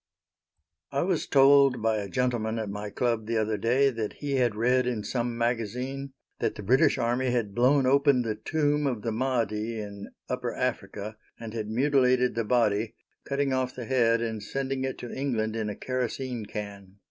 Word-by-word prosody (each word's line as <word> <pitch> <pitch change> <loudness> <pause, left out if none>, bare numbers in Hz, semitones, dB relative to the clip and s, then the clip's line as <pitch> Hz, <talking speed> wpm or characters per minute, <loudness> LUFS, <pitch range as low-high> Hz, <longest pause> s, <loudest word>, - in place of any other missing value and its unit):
I - - 0
was 180 -3 0
told 140 -1 +6
by 110 0 +1
a 100 -2 -4
gentleman 120 -2 0
at 110 -3 -3
my 105 +1 -5
club 115 0 -1
the 115 0 0
other 110 0 +1
day 125 +6 +3
that 110 -3 -3
he 140 -2 -2
had 120 -4 +2
read 125 +3 +2
in 115 -4 -2
some 120 0 -2
magazine 125 +4 -2 0.3
that - - -1
the 105 - -7
British 130 +9 +4
army 125 +1 0
had 115 -5 -1
blown 130 +4 +4
open 140 -1 +4
the 110 -2 -1
tomb 145 +5 0
of 120 -6 -2
the 115 - -1
Mahdi 115 -2 -1
in 100 -1 -7 0.2
upper 125 -1 -3
Africa, 110 -4 -3 0.2
and 115 -1 -7
had 110 -2 -4
mutilated 125 0 +3
the 115 - -1
body, 110 -2 +1 0.3
cutting 140 -1 0
off 130 0 -1
the 125 - -6
head 115 -2 +3
and 110 -2 -3
sending 135 +3 -2
it 130 - -3
to 120 - -7
England 115 -5 -1
in 110 -2 -2
a 105 - -4
kerosene 125 -2 -3
can. 100 -2 -7
120 Hz, 180 wpm, -27 LUFS, 110-130 Hz, 0.3 s, told